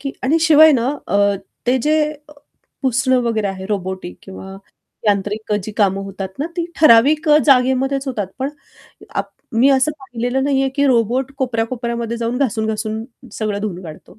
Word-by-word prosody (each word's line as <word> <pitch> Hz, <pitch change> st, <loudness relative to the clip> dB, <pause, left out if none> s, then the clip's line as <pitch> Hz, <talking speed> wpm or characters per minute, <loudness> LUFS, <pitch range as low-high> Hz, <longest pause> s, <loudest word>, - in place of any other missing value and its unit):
की 275 Hz, -1 st, -4 dB
आणि 300 Hz, +6 st, +2 dB
शिवाय 315 Hz, -1 st, +7 dB
ना 245 Hz, -1 st, +1 dB, 0.2 s
अ, 200 Hz, -, 0 dB, 0.5 s
ते 255 Hz, +2 st, +3 dB
जे 310 Hz, +1 st, +3 dB, 0.3 s
अ, -, -, -13 dB, 0.5 s
पुसणं 260 Hz, 0 st, +2 dB
वगैरे 220 Hz, -3 st, 0 dB
आहे 190 Hz, -1 st, -5 dB
रोबोटिक 190 Hz, -3 st, -4 dB
किंवा 190 Hz, 0 st, -10 dB, 0.5 s
यांत्रिक 210 Hz, +1 st, 0 dB
जी 215 Hz, -, -6 dB
कामं 195 Hz, -2 st, +2 dB
होतात 195 Hz, -1 st, -6 dB
ना 290 Hz, -, -1 dB
ती 340 Hz, -1 st, -1 dB
ठराविक 305 Hz, +4 st, +5 dB
अ, 300 Hz, -, +7 dB
जागेमध्येच 270 Hz, +1 st, +3 dB
होतात. 210 Hz, -7 st, -2 dB
पण 265 Hz, +1 st, -1 dB, 0.7 s
अप -, -, -2 dB, 0.3 s
मी 265 Hz, -, +5 dB
असं 270 Hz, +3 st, +3 dB
पाहिलेलं 250 Hz, 0 st, -2 dB
नाही 275 Hz, -1 st, +1 dB
आहे, 270 Hz, -, 0 dB
की 280 Hz, -, +3 dB
रोबोट 250 Hz, +2 st, +1 dB
कोपऱ्या-कोपऱ्यामध्ये 235 Hz, -2 st, -2 dB
जाऊन, 235 Hz, +1 st, -2 dB
घासून-घासून 220 Hz, -3 st, -2 dB, 0.3 s
सगळं 210 Hz, -2 st, -3 dB
धुवून 190 Hz, -4 st, -4 dB
काढतो. 160 Hz, +4 st, -12 dB
235 Hz, 160 wpm, -18 LUFS, 210-270 Hz, 0.7 s, शिवाय